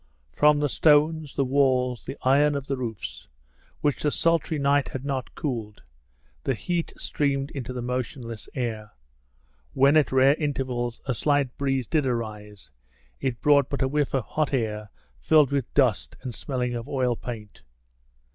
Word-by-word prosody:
From 150 - +4
the 145 - +2
stones, 150 +1 +3
the 140 - +1
walls, 130 -2 +1
the - - -6
iron 145 +3 +4
of 140 -1 -3
the 135 - -2
roofs, 115 -6 -6 0.5
which 145 -2 0
the 150 - +2
sultry 165 0 +1
night 140 0 +2
had 130 +1 -6
not 135 -3 -3
cooled, 115 -9 -4 0.6
the - - 0
heat 175 -2 -2
streamed 140 -1 -1
into 130 -3 -5
the 125 -1 -4
motionless 125 -2 -4
air. 110 -5 -4 0.8
When 140 +3 +4
at 155 -2 +4
rare 130 +1 +5
intervals 130 -5 -2
a 135 - 0
slight 140 +1 +1
breeze 135 -2 0
did 150 -2 +1
arise, 105 - -5 0.5
it 130 -4 -2
brought 140 -2 +4
but 140 - -1
a - - +2
whiff 145 0 0
of 130 - +1
hot 150 +5 -1
air 105 -3 -2 0.3
filled 150 -4 +4
with 140 -4 -1
dust - - +2
and 125 - -5
smelling 125 0 -3
of 120 +3 -5
oil 125 -3 +1
paint. 110 -4 -8
135 Hz, 160 wpm, -25 LUFS, 120-145 Hz, 0.8 s, rare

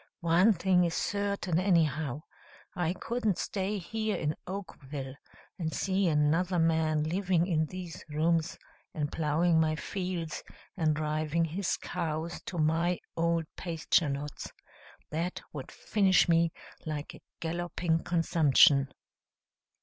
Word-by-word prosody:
One 170 +6 +5
thing 180 0 +3
is 170 -1 0
certain, 200 -4 0
anyhow 155 -6 +1 0.5
I 175 -1 0
couldn't 220 0 -1
stay 200 +1 -2
here 215 +3 -2
in 150 0 -1
Oakville, 145 -8 -6 0.5
and 160 -2 -1
see 190 +1 +1
another 165 +4 +2
man 160 -2 +2
living 175 +1 +1
in 160 -4 +1
these 180 -1 -7
rooms, 160 +2 +1 0.4
and 150 -2 -2
plowing 160 +2 +2
my 155 -1 +2
fields, 180 0 -4 0.3
and 155 -5 +1
driving 155 +2 0
his 175 +4 -1
cows 165 -1 -3
to 175 - -4
my 165 +3 +2 0.2
old 170 0 +1
pasture 165 -2 +1
lots. 140 +1 -5 0.6
That 170 +4 -2
would 140 -4 -7
finish 195 -3 +3
me 165 -1 +3 0.3
like 150 -2 -5
a - - -13 0.2
galloping 170 0 -1
consumption." 155 -4 +4
165 Hz, 120 wpm, -30 LUFS, 155-180 Hz, 0.6 s, One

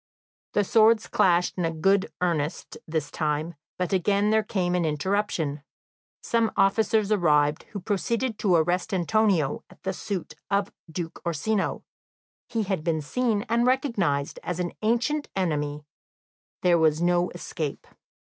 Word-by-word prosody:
The 205 - +3
swords 220 +2 +4
clashed 180 0 +2
in 165 -2 -1
good 195 +3 +2
earnest 165 -4 -1
this 155 -2 -2
time, 155 +1 -1 0.2
but 180 +1 -1
again 200 +3 +2
there 220 0 +4
came 185 -4 -1
an 180 -1 +1
interruption. 160 -2 -1 0.6
Some 230 -2 +1
officers 215 +1 +2
arrived, 150 -6 +2
who 205 - -5
proceeded 220 +4 -1
to 190 -4 +3
arrest 175 +4 +1
Antonio 185 -5 +1
at - - -20
the 190 0 -1
suit 185 -4 -5 0.2
of 200 0 0 0.2
Duke 165 -1 -5
Orsino; 180 +5 -1 0.7
he 225 -2 -1
had 190 -5 -2
been 160 -1 0
seen 215 - 0
and 235 +2 +2
recognised 200 - 0
as 180 0 -4
an 175 -1 -1
ancient 240 +7 +1
enemy; 150 -5 -1 0.8
there 175 -2 +4
was 155 -1 +3
no 175 +1 +2
escape. 155 -4 -5
180 Hz, 140 wpm, -26 LUFS, 160-210 Hz, 0.8 s, swords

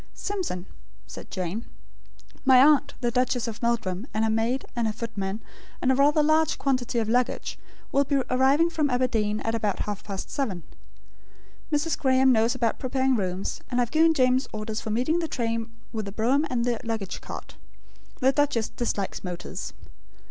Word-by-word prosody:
"Simpson," 365 - -3 0.4
said - - -10
Jane, 185 +4 -3 0.8
"my 260 -2 +7
aunt, 290 +2 +5
the 240 -1 +1
Duchess 250 -1 +1
of 225 -1 -6
Meldrum, 230 -3 -1
and 215 - +2
her 220 - +2
maid, 230 +4 0
and 235 -2 +1
her 215 - -1
footman, 210 -2 -4 0.4
and 260 - +2
a - - +3
rather 295 +3 +4
large 310 +1 +3
quantity 255 -3 0
of 225 -2 +1
luggage, 245 +2 0 0.3
will 280 - +4
be 280 +1 -1 0.2
arriving 275 +6 +4
from 305 -3 +1
Aberdeen, 225 -5 +1
at 225 - -1
about 215 -4 -1
half 210 -1 -4
past 195 -2 -6
seven. 200 - -2 1.1
Mrs. 300 +2 0
Graem 265 -1 +4
knows 230 +1 +3
about 235 -3 0
preparing 260 0 +1
rooms; 185 -3 -2
and 250 - 0
I - - +5
have 235 - -5
given 320 +1 +4
James 255 -1 +3
orders 215 0 -4
for - - -5
meeting 255 +10 +1
the 330 - -1
train 230 -4 -2 0.2
with 215 -2 -3
the 200 - -5
brougham, 255 +9 +2
and 240 -2 0
the 240 -2 0
luggage 220 -5 -3
cart. - - -9 0.6
The 260 +1 +5
duchess 275 -6 +1
dislikes 205 -5 -3
motors. 180 -1 -5
240 Hz, 175 wpm, -26 LUFS, 220-265 Hz, 1.1 s, my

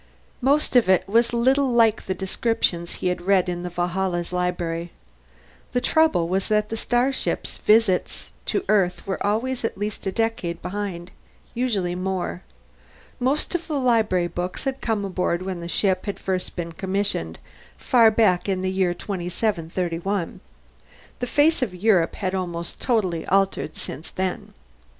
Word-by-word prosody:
Most 280 +2 +2
of 240 -6 +5
it 185 -2 +4
was 230 +4 +3
little 260 +3 +3
like 230 -2 +3
the 190 - -1
descriptions 190 -3 0
he 180 - -1
had 180 0 -2
read 185 0 +3
in 175 -1 -2
the 180 - -4
Valhalla's 175 0 -2
library. 175 -1 -1 0.8
The 250 - +3
trouble 280 - +3
was 190 +2 0
that 210 0 +1
the 225 - -3
starship's 245 +4 0
visits 210 -4 +2 0.2
to 395 - 0
Earth 185 -4 +2
were 190 - -3
always 235 +5 0
at 225 - -2
least 205 0 -4
a - - 0
decade 225 -6 -1
behind, 185 -3 -5 0.4
usually 215 -8 0
more. 185 0 -3 0.8
Most 270 +7 0
of 345 -1 -2
the 300 -4 -1
library 220 -8 +2
books 175 +1 -4
had 270 -1 -3
come 215 -3 -1
aboard 180 -2 -1
when 185 -2 -4
the 170 - -6
ship 185 +2 +1
had 200 - -2
first 185 -1 -2
been 170 -1 -4
commissioned, 190 - -2 0.4
far 230 -3 +5
back 205 -4 +2
in 185 -1 0
the 185 - 0
year 185 -2 +1
2731. 180 -1 -2 0.8
The 245 - -2
face 295 +4 +3
of 210 -8 -1
Europe 180 -3 +2
had 185 -2 -2
almost 175 -2 -3
totally 190 -10 0
altered 195 -5 +1
since 150 +6 -7
then. 185 -1 -4
190 Hz, 155 wpm, -24 LUFS, 180-225 Hz, 0.8 s, of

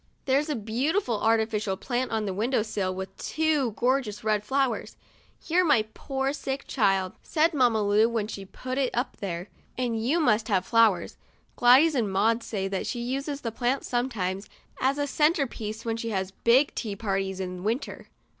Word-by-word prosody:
There's 280 +3 +2
a 300 - 0
beautiful 240 - -1
artificial 220 -3 +1
plant 250 +4 -2
on 220 -1 -1
the 195 - -2
win 215 +6 -1
dow 255 -5 +2
sill, 200 -4 -2
with 190 0 -6
two 305 -7 0
gorgeous 245 -3 0
red 215 -1 +1
flowers. 265 +1 -1 0.2
" - - -31
You're 355 +3 +3
my 285 -10 +3
poor 270 +1 -2
sick 275 -2 -4
child," 195 -6 +1
said 325 +2 +1
Mamma 240 -6 +3
Lu 210 +3 +4
when 225 -3 -1
she 200 -2 -6
put 255 +7 -5
it 265 -2 +2
up 245 +3 -2
there, 180 -2 -4 0.3
"and 235 -3 -1
you 290 +9 +2
must 220 -7 +2
have 190 -4 +1
flowers." 220 -6 +3 0.4
Gladys 265 +6 +6
and 230 -7 0
Maud 225 +5 +2
say 205 -4 -3
that 195 -1 -3
she 240 - -3
uses 275 +4 -3
the 230 - -3
plant 245 +4 -1
sometimes 210 -6 -2 0.3
as 270 +2 +1
a 290 - 0
center 300 +1 +2
piece 220 -2 -6
when 225 -1 -1
she 230 0 -4
has 190 -3 -2
big 250 +8 +3
tea 210 -4 -4
parties, 195 -2 -2
in 180 -1 -5
winter. 230 +6 -3
230 Hz, 185 wpm, -27 LUFS, 205-265 Hz, 0.4 s, Gladys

